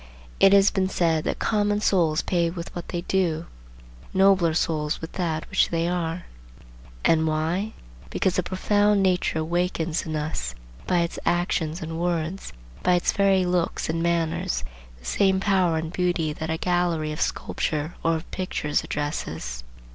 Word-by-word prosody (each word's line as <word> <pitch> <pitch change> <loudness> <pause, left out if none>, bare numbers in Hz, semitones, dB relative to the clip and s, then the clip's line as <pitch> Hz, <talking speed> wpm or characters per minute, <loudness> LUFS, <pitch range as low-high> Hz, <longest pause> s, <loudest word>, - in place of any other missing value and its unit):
It 195 - +7
has 200 0 +6
been 190 -2 0
said 165 -4 +1
that - - -1
"common 205 -1 +1
souls 170 -7 +2
pay 170 -2 +1
with 170 0 -7
what 175 - -6
they 175 - -3
do, 175 -3 0 0.7
nobler 190 -4 +4
souls 155 -2 0
with 160 - -7
that 165 -4 -2
which - - +3
they 165 0 0
are." 175 -1 -2 0.8
And 160 -1 +4
why? 165 +7 -1 0.4
Because 185 -1 0
a - - +4
profound 205 +2 +2
nature 180 -3 +1
awakens 170 0 -1
in 155 - -3
us 105 - -3 0.3
by 175 - +3
its 170 - -2
actions 175 -1 0
and 160 +1 -5
words, 175 +1 -2 0.3
by 180 - +3
its 175 - +2
very 195 -2 +3
looks 180 -2 0
and 165 +1 -1
manners, 165 - 0 0.3
the - - -18
same 190 - +2
power 190 -4 +2
and 160 +1 -4
beauty 175 -4 0
that 160 +1 -5
a 160 - 0
gallery 175 -3 0
of 150 - -5
sculpture 155 +2 -2
or 165 0 +2
of 160 - -6
pictures 155 -5 -1
addresses. 80 - -4
170 Hz, 160 wpm, -25 LUFS, 160-185 Hz, 0.8 s, It